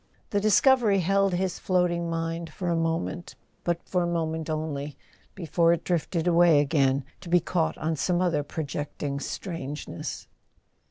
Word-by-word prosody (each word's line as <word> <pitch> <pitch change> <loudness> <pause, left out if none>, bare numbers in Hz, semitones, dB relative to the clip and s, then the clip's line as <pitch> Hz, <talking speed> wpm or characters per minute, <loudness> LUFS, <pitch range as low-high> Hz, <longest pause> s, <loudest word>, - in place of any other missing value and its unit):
The 205 - +2
discovery 215 -1 +4
held 195 +1 +2
his 185 0 -1
floating 175 -2 +1
mind 165 0 -3
for 175 +2 -3
a 170 - +2
moment, 165 +1 -2 0.3
but 170 -1 -1
for 180 - +1
a 175 - 0
moment 160 -2 -2
only, 150 -2 -3 0.4
before 170 -1 +2
it 170 - -2
drifted 170 -1 -1
away 170 -3 +5
again, 140 -2 +2
to 180 - -10
be 175 +1 +5
caught 170 -1 -1
on 160 +1 -1
some 175 +4 0
other 170 -5 +1
projecting 145 -1 -4
strange¬ 150 -3 -5
ness. 85 - -6
165 Hz, 155 wpm, -27 LUFS, 155-180 Hz, 0.4 s, away